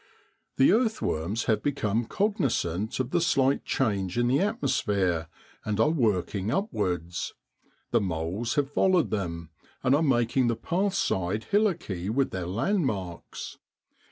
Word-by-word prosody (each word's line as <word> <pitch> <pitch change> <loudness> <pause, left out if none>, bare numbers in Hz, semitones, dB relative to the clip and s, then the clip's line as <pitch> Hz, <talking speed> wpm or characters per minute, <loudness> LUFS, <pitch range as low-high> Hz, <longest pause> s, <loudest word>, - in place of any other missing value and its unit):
The 135 - +6
earthworms 120 - 0
have 110 -2 +1
become 115 -5 0
cognisant 125 - -1
of 130 0 -1
the 175 - +2
slight 140 -5 +2
change 100 -7 0
in 120 - +3
the 135 - +3
atmos 215 +4 0
phere, 90 -7 0 0.4
and 105 0 -2
are 150 +7 +4
working 105 - 0
upwards. 90 - -2 0.6
The - - +3
moles 95 - -2
have 145 -2 0
followed 185 -1 +3
them, 85 -6 -3 0.3
and 130 0 +3
are 145 - +4
making 125 -3 +2
the 115 - +1
path 190 - -1
side 95 - 0
hillocky 170 - 0
with 130 +4 +1
their 90 -2 -3
landmarks. 105 - -2
115 Hz, 135 wpm, -27 LUFS, 95-150 Hz, 0.6 s, The